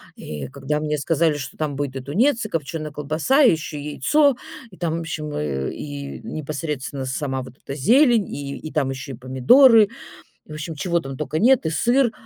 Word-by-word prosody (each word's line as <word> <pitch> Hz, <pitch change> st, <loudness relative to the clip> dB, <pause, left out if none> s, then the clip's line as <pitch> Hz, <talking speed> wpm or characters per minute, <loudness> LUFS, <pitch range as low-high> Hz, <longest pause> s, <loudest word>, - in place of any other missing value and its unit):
И 75 Hz, -3 st, -6 dB
когда 140 Hz, +2 st, -2 dB
мне 150 Hz, 0 st, -1 dB
сказали, 155 Hz, +1 st, +1 dB
что 135 Hz, -, -7 dB
там 150 Hz, -3 st, -2 dB
будет 140 Hz, -2 st, -3 dB
и 135 Hz, -, -4 dB
тунец, 225 Hz, -, +1 dB
и -, -, -5 dB
копчёная 155 Hz, -1 st, -4 dB
колбаса, 155 Hz, -, +1 dB
и 245 Hz, -, +7 dB
ещё 155 Hz, -2 st, -3 dB
яйцо, 280 Hz, -, +2 dB, 0.4 s
и 185 Hz, -, -15 dB
там, 165 Hz, -2 st, -1 dB
в -, -, -2 dB
общем, 155 Hz, -2 st, -5 dB
и 70 Hz, -3 st, -2 dB, 0.2 s
и 140 Hz, -1 st, -6 dB
непосредственно 145 Hz, -3 st, -4 dB
сама 130 Hz, 0 st, -2 dB
вот 125 Hz, 0 st, -11 dB
эта 135 Hz, -, -7 dB
зелень, 235 Hz, -, +4 dB
и 140 Hz, -1 st, -5 dB
и 155 Hz, -, -8 dB
там 140 Hz, -4 st, 0 dB
ещё 135 Hz, 0 st, -6 dB
и -, -, -9 dB
помидоры, 210 Hz, -, +6 dB, 0.6 s
и, -, -, -29 dB
в -, -, -6 dB
общем, 155 Hz, +1 st, -5 dB
чего 170 Hz, +3 st, 0 dB
там 135 Hz, -3 st, -7 dB
тока 150 Hz, +1 st, -2 dB
нет, 245 Hz, -3 st, +4 dB
и -, -, +1 dB
сыр. 240 Hz, +7 st, +2 dB
150 Hz, 200 wpm, -22 LUFS, 135-175 Hz, 0.6 s, и